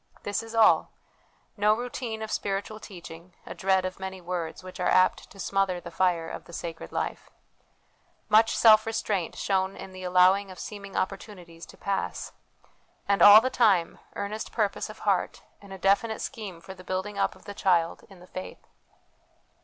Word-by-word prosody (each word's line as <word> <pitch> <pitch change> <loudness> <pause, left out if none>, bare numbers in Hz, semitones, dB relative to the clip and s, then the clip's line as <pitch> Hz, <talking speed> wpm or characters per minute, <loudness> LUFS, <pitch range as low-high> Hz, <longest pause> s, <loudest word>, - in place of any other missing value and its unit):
This 205 0 -2
is 225 0 -9
all: 225 -1 +5 0.7
no 210 0 +3
routine 240 -2 -5
of 220 - -6
spiritual 200 +2 -3
teaching; 175 -3 -11
a - - -7
dread 190 -1 +1
of 185 0 -5
many 190 0 -6
words, 175 -1 -5
which 185 0 -10
are 180 - +1
apt 185 0 +3
to 195 - -16
smother 195 -2 0
the 170 -1 -10
fire 170 -1 +1
of - - -8
the 170 - -14
sacred 165 -1 -6
life; - - -4 1.0
much 220 +1 +4
self 220 -1 +6
restraint 210 -5 -2
shown 190 -1 -1
in 190 - -9
the 185 0 -10
allowing 185 +2 +4
of 185 - -10
seeming 200 -1 -8
opportunities 185 -4 -5
to - - -15
pass; 200 -1 -3 0.8
and 200 0 +2
all 205 +1 +10
the 255 +2 -1
time, 200 -10 +2 0.2
earnest 205 +2 -4
purpose 210 -4 -1
of - - -10
heart, - - -1 0.2
and 200 -1 -14
a 190 - -7
definite 200 +4 +1
scheme 205 -9 -6
for 190 - -9
the 185 -1 -14
building 190 +3 -4
up - - +1
of - - -19
the 205 - -7
child 170 -4 +1
in 195 -2 -15
the 180 - -14
faith. 185 0 -9
195 Hz, 175 wpm, -27 LUFS, 180-210 Hz, 1.0 s, all